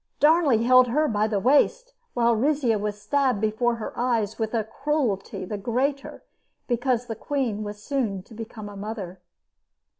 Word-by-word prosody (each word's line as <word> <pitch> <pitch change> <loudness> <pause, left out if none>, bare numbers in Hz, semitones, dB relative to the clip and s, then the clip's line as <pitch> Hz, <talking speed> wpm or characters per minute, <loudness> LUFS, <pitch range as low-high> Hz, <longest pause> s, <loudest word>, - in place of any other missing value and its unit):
Darnley 295 -7 +4
held 255 +1 +6
her 300 +6 +1
by 215 -3 +1
the 210 -2 0
waist 475 - +2 0.2
while 235 -1 +3
Rizzio 255 -3 +1
was 210 0 -3
stabbed 255 +1 +1
before 220 +3 +1
her 225 - -6
eyes 230 -4 -1
with 220 +1 -2
a 225 - +1
cruelty 230 -6 -2
the 205 +2 -5
greater 265 +6 -2 0.4
because 245 0 0
the 225 - -5
queen 235 -4 -2
was 210 0 -7
soon 220 -10 -2
to 225 - -16
become 220 -1 -8
a 205 - -9
mother. 195 -3 -6
230 Hz, 160 wpm, -25 LUFS, 210-265 Hz, 0.4 s, held